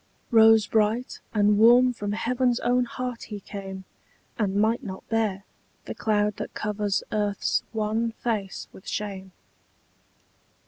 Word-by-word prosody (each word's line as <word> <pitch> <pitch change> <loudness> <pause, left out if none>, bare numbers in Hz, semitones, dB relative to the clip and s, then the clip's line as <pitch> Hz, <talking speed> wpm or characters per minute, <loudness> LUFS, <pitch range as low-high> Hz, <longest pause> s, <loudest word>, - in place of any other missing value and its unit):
Rose 225 -2 +6
bright 220 +4 0
and 210 -1 +3
warm 245 +3 +6
from 205 -3 -4
heaven's 245 +2 0
own 245 +1 +2
heart 250 0 -5
he 210 -2 -7
came, 195 -1 -8 0.5
And 200 -3 -1
might 220 +5 +2
not 190 -4 -8
bear 215 -4 0 0.4
The - - -5
cloud 210 -1 0
that - - -6
covers 210 -1 -1
earth's 205 -2 0
wan 220 +1 -1
face 215 -5 -3
with 190 - -14
shame. 195 -2 -4
215 Hz, 130 wpm, -25 LUFS, 205-230 Hz, 0.5 s, Rose